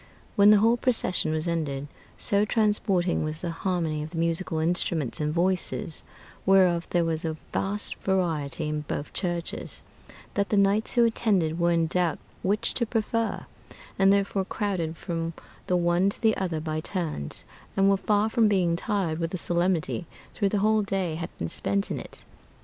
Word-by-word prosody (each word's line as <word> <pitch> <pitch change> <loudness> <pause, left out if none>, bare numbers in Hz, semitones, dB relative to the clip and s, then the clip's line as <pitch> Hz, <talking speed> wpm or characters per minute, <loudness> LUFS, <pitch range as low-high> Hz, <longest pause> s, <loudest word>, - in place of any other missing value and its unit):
When 200 0 +7
the 210 - +8
whole 225 +3 +4
procession 225 -10 +1
was 155 +2 -1
ended, 145 -4 -2 0.3
so 200 0 +2
transporting 205 -6 +1
was 155 0 -4
the 175 - -2
harmony 165 -3 -1
of 155 - -5
the 165 - -8
musical 165 0 0
instruments 160 -4 0
and 150 0 0
voices, 175 -1 -1 0.4
whereof 185 -3 +4
there 175 -1 +2
was 160 0 0
a 160 -1 -2 0.2
vast 205 +2 -1
variety 165 -5 0
in 150 0 -2
both 145 0 -5
churches, 175 -3 -3 0.5
that 200 0 0
the 210 - +2
knights 200 +2 +3
who 240 -1 +5
attended 190 -8 +1
were 170 0 +3
in 165 -1 +2
doubt 170 0 0 0.2
which 205 +3 +1
to 235 - +1
prefer, 225 0 -1 0.5
and 195 0 +6
therefore 200 -1 +1
crowded 185 -6 -2
from 165 0 -3 0.3
the 180 - +2
one 175 +2 +2
to - - -3
the 220 -2 +3
other 175 -4 -2
by 155 0 -3
turns, 155 - -4 0.3
and 195 0 +4
were 195 - +5
far 205 +2 +1
from 225 -1 +3
being 180 -5 +2
tired 170 -3 -1
with 165 -1 -1
the 185 - -4
solemnity, 175 -1 0 0.3
though 200 - +3
the 205 - 0
whole 215 +2 +3
day 190 -4 -1
had 165 +1 -4
been 85 - -3
spent 100 +4 -1
in - - -2
it. - - -10
175 Hz, 175 wpm, -26 LUFS, 165-200 Hz, 0.5 s, the